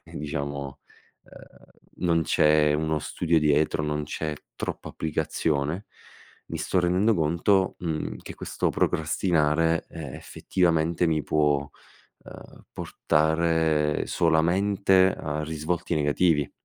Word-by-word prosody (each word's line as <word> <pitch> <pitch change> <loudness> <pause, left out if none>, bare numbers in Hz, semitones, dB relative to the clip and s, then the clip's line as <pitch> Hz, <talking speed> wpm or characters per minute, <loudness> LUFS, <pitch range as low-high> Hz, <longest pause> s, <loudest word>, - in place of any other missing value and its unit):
diciamo, 70 -2 -5 0.5
ehm, - - -17 0.4
non 85 -1 +3
c'è 75 -1 +3
uno 80 0 0
studio 85 +2 0
dietro, 75 0 +2
non 75 0 -2
c'è 75 +1 -4 0.2
troppa - - -5
applicazione. 80 +2 -2 0.6
Mi - - -5
sto 90 - 0
rendendo 95 +6 +2
conto, 85 +4 +1
mhmm, 80 -3 -3
che - - -9
questo - - -2
procrastinare, 80 0 +1
ehm, 80 -5 -7
effettivamente 85 -1 0
mi 80 -2 +1
può, 75 -1 +1 0.6
ehm, - - -13
portare 80 -1 +1
solamente 95 +3 +3
a 75 0 -3
risvolti 80 +3 -2
negativi. 75 0 +1
80 Hz, 105 wpm, -26 LUFS, 75-85 Hz, 0.6 s, non